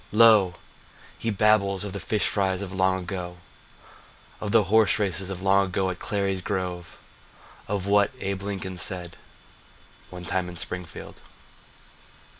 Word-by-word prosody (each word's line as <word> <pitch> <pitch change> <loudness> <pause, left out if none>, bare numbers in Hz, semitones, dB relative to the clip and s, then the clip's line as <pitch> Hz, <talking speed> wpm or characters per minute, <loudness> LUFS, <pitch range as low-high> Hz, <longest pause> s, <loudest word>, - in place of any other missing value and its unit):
Lo! 105 -4 +6 0.6
he 115 - -1
babbles 105 -2 +3
of 100 -2 -5
the 100 - -4
fish 105 0 0
frys 95 -1 0
of 95 -1 -6
long 95 0 +2
ago, 90 -1 -5 1.0
Of 105 - -3
the 115 -1 +5
horse 105 +2 +4
races 95 -3 -1
of 95 -1 -5
long 100 0 +4
ago 95 0 0
at 90 - -8
Clary's 100 -2 -1
Grove, 90 -3 -4 0.7
Of 100 -2 -2
what 100 0 +4
Abe 95 -2 -3
Lincoln 95 -2 -4
said 90 -2 -4 0.9
One 90 -1 -9
time 90 +1 -1
at 85 - -9
Springfield. 90 -2 -6
95 Hz, 140 wpm, -26 LUFS, 90-100 Hz, 1.0 s, Lo